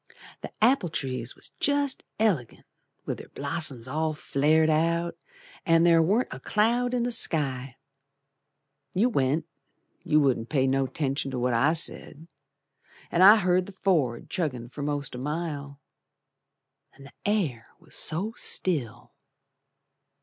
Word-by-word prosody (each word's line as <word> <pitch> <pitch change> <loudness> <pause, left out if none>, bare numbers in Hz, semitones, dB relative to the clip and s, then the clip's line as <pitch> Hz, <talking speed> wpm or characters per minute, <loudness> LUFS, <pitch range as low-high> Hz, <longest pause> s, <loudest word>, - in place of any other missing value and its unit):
The - - -7
apple 235 -6 +3
trees 130 -5 -4
was - - -10
jest 285 -1 +1
elegant 185 - 0 0.4
With - - -4
their - - -11
blossoms 140 -4 -3
all 155 +3 -1
flared 155 +2 +2
out, 170 +2 +1 0.5
An' 165 0 +4
there 170 -1 +5
warn't 205 +10 +1
a - - -8
cloud 240 +4 +1
in 240 - 0
the 245 - -1
sky. 135 - -1 1.2
You 220 +7 +3
went, 140 - 0 0.6
you 155 - +3
wouldn't 130 -5 +1
pay 135 -4 +2
no 135 0 +1
'tention 135 0 -2
to 130 - -4
what 125 0 0
I 140 +7 +3
said, 160 -1 0 0.9
An' 175 - +2
I 200 +3 +10
heard 185 -3 +1
the 200 - -10
Ford 155 -12 0
chuggin' 130 -9 -3
for 145 - -7
most 145 -1 -3
a 125 - -6
mile, 145 -1 -4 1.2
The 140 0 -14
air 165 - -1
was - - -10
so 195 +8 -1
still. 120 - -2
155 Hz, 135 wpm, -27 LUFS, 135-185 Hz, 1.2 s, I